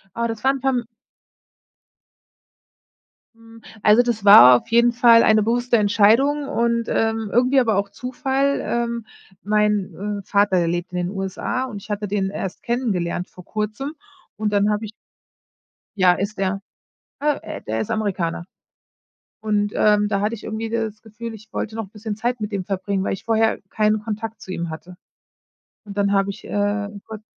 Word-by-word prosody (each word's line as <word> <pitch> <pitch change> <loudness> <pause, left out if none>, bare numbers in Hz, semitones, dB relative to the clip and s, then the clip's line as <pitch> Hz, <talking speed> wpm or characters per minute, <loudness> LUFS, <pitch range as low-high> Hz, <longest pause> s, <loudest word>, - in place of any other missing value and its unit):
Aber 235 0 -1
das 225 0 -6
war 270 - +5
'n 270 - -5
perm 255 -3 0 2.5
Hm, 230 0 -17 0.2
also 215 +3 +6
das 230 -4 -2
war 125 -11 +10
auf - - -23
jeden 235 +1 +4
Fall 235 -1 +6
eine 215 -1 +4
bewusste 240 +2 +1
Entscheidung 230 +8 +3
und, 235 -3 0
ähm, 225 -2 0
irgendwie 255 +3 +4
aber 220 -5 +1
auch 200 0 0
Zufall. 265 +4 -1
Ähm, 235 -1 -2 0.4
mein, 210 -1 0
äh, - - -39
Vater 200 -2 +2
der 170 -1 +2
lebt 175 +1 -3
in 180 - -3
den 175 +1 -2
USA, 195 +6 -3
und 210 -6 -7
ich - - -14
hatte 205 0 -3
den 195 -1 -1
erst 195 -1 -5
kennengelernt 195 -8 -2
vor 180 - -14
Kurzem, 215 - -4 0.4
und 210 -1 -2
dann 205 +1 +2
habe 210 +1 -1
ich 215 - -7 1.0
Ja, 185 -2 +5
ist 200 +2 -4
er. 195 0 -1 0.6
Äh 295 -1 +1 0.2
äh, - - -16
der 110 +1 -3
ist - - -4
Amerikaner. 185 -6 -2 1.0
Und, 205 -1 0
ähm, 210 -1 +3
da 200 -1 0
hatte 215 +3 0
ich 215 - -11
irgendwie 220 +1 -4
das 220 -2 -3
Gefühl, 225 +1 -8
ich 215 0 -13
wollte 220 +1 -4
noch 215 -4 -5
bisschen 210 -1 -6
Zeit 240 +2 -2
mit 210 0 -4
ihm 190 -2 -2
verbringen, 195 0 -2
weil - - -1
ich 195 - -6
vorher 225 -1 +1
keinen 215 0 +1
Kontakt 220 0 -5
zu - - -11
ihm 170 -2 -4
hatte. 180 +3 -9 0.9
Und, 205 -1 -10
dann 200 0 +1
habe 195 0 +2
ich, 205 - -10
äh, 205 0 -1 0.2
kurz 220 -1 -9
215 Hz, 175 wpm, -21 LUFS, 200-230 Hz, 2.5 s, war